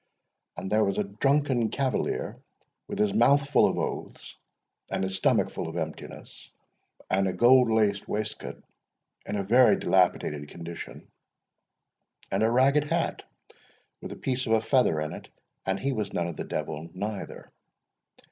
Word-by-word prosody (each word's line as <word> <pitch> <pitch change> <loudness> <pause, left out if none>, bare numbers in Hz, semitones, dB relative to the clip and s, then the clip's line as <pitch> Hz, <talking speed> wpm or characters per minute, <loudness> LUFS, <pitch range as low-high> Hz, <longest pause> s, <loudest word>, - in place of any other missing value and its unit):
And 95 - -5
there 110 +1 +4
was 100 -1 0
a 105 - +2
drunken 125 +3 +1
cavalier, 135 +1 -2 0.5
with - - -5
his 105 -2 +1
mouth 135 +6 +4
full 145 - +4
of - - -2
oaths, - - -5 0.5
and - - -2
his 95 0 -1
stomach - - +2
full - - -4
of 80 +1 -6
emptiness, 80 -2 -7 0.6
and 95 +1 +2
a 95 - -1
gold 120 +4 +5
laced 105 -3 +1
waistcoat 110 +1 -4 0.6
in - - -3
a 100 - -1
very 115 +2 +5
dilapidated 75 -5 +1
condition, 85 0 -9 1.2
and 95 - 0
a 110 - +4
ragged 135 +5 +3
hat,—with 165 +2 -6
a - - -6
piece 130 -1 -2
of 110 - +2
a 110 - +4
feather 125 - +2
in 75 0 -3
it; - - -9 0.4
and 95 0 0
he 135 0 -1
was 110 -4 -3
none 85 -1 -1
of 85 - -5
the - - -5
Devil 80 +3 -4
neither. 105 +1 -6
105 Hz, 155 wpm, -27 LUFS, 95-130 Hz, 1.2 s, gold